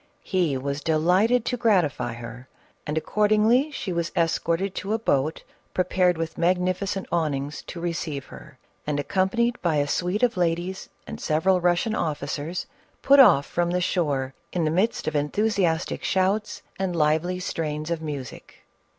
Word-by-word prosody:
He 175 Hz, -8 st, 0 dB
was 140 Hz, +2 st, -3 dB
delighted 185 Hz, +10 st, +2 dB
to 245 Hz, -, -1 dB
gratify 180 Hz, -, +1 dB
her, 120 Hz, +2 st, -9 dB, 0.4 s
and 150 Hz, +1 st, -2 dB
accordingly 215 Hz, -, +3 dB
she 210 Hz, -10 st, -4 dB
was 170 Hz, 0 st, -2 dB
escorted 170 Hz, +3 st, 0 dB
to 200 Hz, +2 st, -3 dB
a -, -, +2 dB
boat 155 Hz, -8 st, 0 dB, 0.3 s
prepared 180 Hz, -1 st, +2 dB
with 165 Hz, 0 st, -4 dB
magnificent 185 Hz, +2 st, 0 dB
awnings 150 Hz, -4 st, -1 dB
to 175 Hz, -, -7 dB
receive 165 Hz, -5 st, -3 dB
her, 65 Hz, -2 st, -13 dB, 0.3 s
and, 145 Hz, -1 st, 0 dB
accompanied 235 Hz, +9 st, 0 dB
by 170 Hz, -3 st, +1 dB
a 145 Hz, -1 st, +2 dB
suite 180 Hz, -, -1 dB
of 240 Hz, -5 st, +2 dB
ladies 175 Hz, +2 st, -1 dB, 0.2 s
and -, -, -8 dB
several 180 Hz, +4 st, +2 dB
Russian 175 Hz, +5 st, +1 dB
officers, 155 Hz, -1 st, -3 dB, 0.4 s
put 280 Hz, +1 st, +6 dB
off 145 Hz, -, +7 dB
from 175 Hz, 0 st, -1 dB
the 180 Hz, +1 st, 0 dB
shore 145 Hz, -7 st, -1 dB, 0.2 s
in 175 Hz, -, -1 dB
the 155 Hz, -, +1 dB
midst 190 Hz, +5 st, 0 dB
of 155 Hz, -, 0 dB
enthu 150 Hz, +8 st, 0 dB
siastic 170 Hz, -4 st, 0 dB
shouts 195 Hz, +3 st, 0 dB, 0.2 s
and 190 Hz, -2 st, -1 dB
lively 160 Hz, +3 st, +1 dB
strains 155 Hz, -2 st, -3 dB
of 165 Hz, -1 st, -1 dB
music. 145 Hz, -5 st, -7 dB
175 Hz, 155 wpm, -25 LUFS, 150-190 Hz, 0.4 s, off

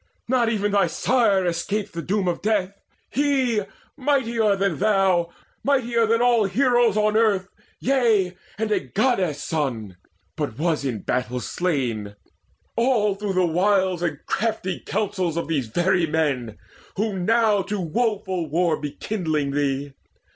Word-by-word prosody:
Not 240 Hz, -2 st, +2 dB
even 205 Hz, -2 st, 0 dB
thy 200 Hz, -1 st, +3 dB
sire 215 Hz, -7 st, +2 dB
escaped 195 Hz, +5 st, -2 dB
the 170 Hz, -, -4 dB
doom 195 Hz, +2 st, -1 dB
of 175 Hz, -, -1 dB
death 200 Hz, -3 st, 0 dB, 0.4 s
He, 265 Hz, -5 st, +1 dB, 0.3 s
mightier 235 Hz, -7 st, +1 dB
than 195 Hz, -5 st, -1 dB
thou, 190 Hz, -4 st, +2 dB, 0.3 s
mightier 240 Hz, -5 st, +2 dB
than 230 Hz, +2 st, +2 dB
all 240 Hz, -3 st, +4 dB
Heroes 240 Hz, +1 st, +3 dB
on 215 Hz, 0 st, +2 dB
earth, 205 Hz, -4 st, +2 dB, 0.3 s
yea, 225 Hz, -9 st, +2 dB, 0.2 s
and 220 Hz, 0 st, -2 dB
a -, -, +3 dB
Goddess' 185 Hz, -, 0 dB
son 120 Hz, -, -3 dB, 0.4 s
But 140 Hz, -7 st, -4 dB
was 160 Hz, -2 st, 0 dB
in 125 Hz, -6 st, -3 dB
battle 125 Hz, 0 st, -1 dB
slain, 120 Hz, -, -2 dB, 0.6 s
all 230 Hz, -4 st, +2 dB
through 200 Hz, 0 st, -3 dB
the 185 Hz, -1 st, +3 dB
wiles 185 Hz, +1 st, +2 dB
And 165 Hz, -4 st, -1 dB
crafty 195 Hz, -4 st, -1 dB
counsels 185 Hz, -5 st, -2 dB
of 170 Hz, -, -2 dB
these 145 Hz, -7 st, -1 dB
very 175 Hz, +6 st, +1 dB
men 140 Hz, -8 st, -1 dB, 0.4 s
Who 205 Hz, -1 st, -1 dB
now 215 Hz, +1 st, +3 dB
to 200 Hz, +2 st, -3 dB
woeful 190 Hz, -2 st, -1 dB
war 165 Hz, 0 st, +1 dB
be 145 Hz, -2 st, -4 dB
kindling 155 Hz, -9 st, -2 dB
thee. 140 Hz, 0 st, -1 dB
190 Hz, 140 wpm, -23 LUFS, 160-220 Hz, 0.6 s, all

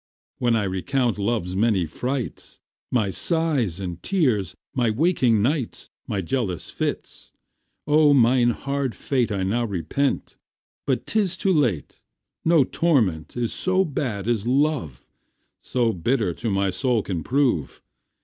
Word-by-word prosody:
When 120 Hz, -2 st, +2 dB
I 110 Hz, -, +1 dB
recount 115 Hz, +5 st, -1 dB
love's 100 Hz, -4 st, -1 dB
many 100 Hz, -3 st, +2 dB
frights, 125 Hz, -, -4 dB, 0.3 s
My 110 Hz, -6 st, +1 dB
sighs 145 Hz, -, 0 dB
and 90 Hz, -3 st, -5 dB
tears, 120 Hz, -, 0 dB, 0.2 s
my 125 Hz, -4 st, +1 dB
waking 120 Hz, -, +2 dB
nights, 135 Hz, -1 st, -2 dB, 0.2 s
My 100 Hz, -, -1 dB
jealous 95 Hz, -3 st, -3 dB
fits; -, -, -4 dB, 0.5 s
O 150 Hz, 0 st, +5 dB
mine 125 Hz, -2 st, +4 dB
hard 140 Hz, +1 st, -2 dB
fate 125 Hz, -5 st, 0 dB
I 100 Hz, -2 st, -1 dB
now 110 Hz, +6 st, 0 dB
repent, 100 Hz, -, -2 dB, 0.5 s
but 130 Hz, -2 st, 0 dB
'tis 195 Hz, -5 st, 0 dB
too 190 Hz, +1 st, +2 dB
late. 120 Hz, -, 0 dB, 0.4 s
No 165 Hz, -3 st, +5 dB
torment 120 Hz, -, 0 dB
is 120 Hz, -2 st, -1 dB
so 185 Hz, +1 st, +1 dB
bad 120 Hz, -9 st, -3 dB
as 115 Hz, -2 st, 0 dB
love, 130 Hz, -, 0 dB, 0.6 s
So 120 Hz, -3 st, 0 dB
bitter 105 Hz, +1 st, 0 dB
to 115 Hz, +6 st, -4 dB
my 100 Hz, -1 st, +1 dB
soul 115 Hz, +3 st, 0 dB
can 85 Hz, -5 st, -3 dB
prove. 120 Hz, -, 0 dB
120 Hz, 135 wpm, -23 LUFS, 100-140 Hz, 0.6 s, O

